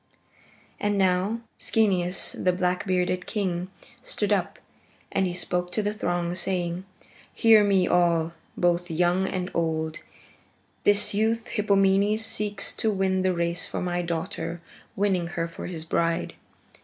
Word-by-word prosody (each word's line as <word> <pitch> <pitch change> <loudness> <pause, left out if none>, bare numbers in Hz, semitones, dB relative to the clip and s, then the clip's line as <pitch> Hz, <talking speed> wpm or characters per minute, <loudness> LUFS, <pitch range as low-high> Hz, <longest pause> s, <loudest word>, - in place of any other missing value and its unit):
And 205 0 0
now 190 +4 +2 0.2
Schoeneus, 185 -5 +1
the 185 - +1
black 180 +1 -1
bearded 180 0 0
king, 185 -4 -1 0.3
stood 210 -4 0
up, 190 -3 -1 0.5
and 190 - +1
he 175 - -3
spoke 180 0 -2
to 215 - 0
the 205 0 0
throng, 175 -4 -1
saying, 180 0 -2 0.5
"Hear 220 -2 +6
me 195 -3 +3
all, 170 -2 +2 0.2
both 175 0 +1
young 175 +3 +2
and 185 0 -3
old: 160 -1 -1 0.9
this 205 0 +4
youth, 225 +2 0
Hippomenes, 200 +1 +2
seeks 210 -2 -2
to 220 - +1
win 190 -2 +1
the 185 -1 +1
race 170 0 -1
from - - -3
my 175 0 -1
daughter, 165 0 -3 0.4
winning 190 -4 +1
her 165 0 0
for 165 - -7
his 165 -3 -6
bride. 165 0 0
180 Hz, 140 wpm, -26 LUFS, 175-200 Hz, 0.9 s, Hear